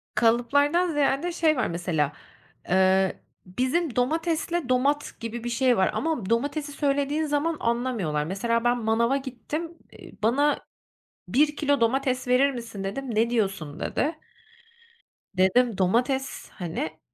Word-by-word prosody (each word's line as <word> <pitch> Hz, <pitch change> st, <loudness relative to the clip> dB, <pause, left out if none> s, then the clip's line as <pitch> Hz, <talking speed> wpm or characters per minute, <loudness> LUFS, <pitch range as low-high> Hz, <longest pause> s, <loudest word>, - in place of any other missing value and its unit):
Kalıplardan 285 Hz, +9 st, +3 dB
ziyade 290 Hz, +3 st, +1 dB
şey 320 Hz, -3 st, +2 dB
var 250 Hz, -, +1 dB
mesela, 170 Hz, -4 st, -1 dB, 0.6 s
eee, 190 Hz, +1 st, +3 dB, 0.3 s
bizim 255 Hz, -, -1 dB
domatesle 325 Hz, +3 st, 0 dB
domat 280 Hz, +3 st, +1 dB
gibi 230 Hz, 0 st, -5 dB
bir 240 Hz, -, -3 dB
şey 250 Hz, 0 st, +2 dB
var 190 Hz, -, +3 dB
ama 310 Hz, -12 st, -2 dB
domatesi 285 Hz, +5 st, -1 dB
söylediğin 285 Hz, +2 st, 0 dB
zaman 300 Hz, +2 st, 0 dB
anlamıyorlar. 230 Hz, -11 st, -1 dB
Mesela 230 Hz, +7 st, -1 dB
ben 240 Hz, 0 st, +2 dB
manava 235 Hz, +4 st, +2 dB
gittim, 295 Hz, +6 st, -6 dB
iii, -, -, -14 dB
"Bana 285 Hz, +6 st, +2 dB, 0.7 s
1 295 Hz, +3 st, +2 dB
kilo 285 Hz, -2 st, +1 dB
domates 255 Hz, +2 st, +1 dB
verir 260 Hz, +3 st, +4 dB
misin?" 230 Hz, -6 st, -7 dB
dedim, 240 Hz, +4 st, -4 dB
"Ne 225 Hz, +2 st, +3 dB
diyorsun?" 190 Hz, -10 st, -2 dB
dedi. 315 Hz, +3 st, -1 dB, 1.2 s
Dedim: 210 Hz, +4 st, +3 dB
"Domates." 245 Hz, +8 st, 0 dB
Hani, 160 Hz, -3 st, -5 dB
250 Hz, 125 wpm, -26 LUFS, 220-290 Hz, 1.2 s, verir